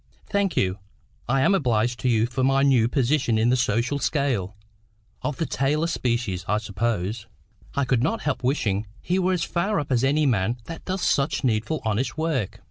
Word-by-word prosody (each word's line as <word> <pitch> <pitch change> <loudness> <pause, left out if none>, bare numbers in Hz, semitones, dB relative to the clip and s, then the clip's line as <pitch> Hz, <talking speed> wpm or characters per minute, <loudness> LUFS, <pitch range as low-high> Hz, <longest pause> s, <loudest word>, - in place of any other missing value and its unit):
"Thank 200 -3 0
you. 95 +2 +1 0.5
I 135 +1 +3
am 165 - +4
obliged 120 - +1
to 130 - 0
you 115 -2 +3
for 125 +2 -2
my 135 +1 +3
new 130 -5 +4
position 130 -2 +1
in 110 +2 +3
the 125 - +4
social 125 +3 0
scale. 125 - -1 0.7
Of 150 - -3
the 165 - -1
tailor 145 +3 0
species, 120 - -1
I 105 - +2
suppose." 105 0 -2 0.5
I 140 - +1
could 125 -2 +1
not 225 - 0
help 140 -4 -2
wishing 110 -6 0
he 180 +2 0
were 185 0 +2
as 180 - 0
far 190 +3 0
up 145 -1 -5
as 125 -1 +2
any 145 +3 +3
man 115 -2 +1
that 165 +4 -8
does 185 0 -2
such 145 +2 +1
needful 115 +5 0
honest 110 +4 -1
work. 155 - -1
130 Hz, 190 wpm, -24 LUFS, 110-150 Hz, 0.7 s, am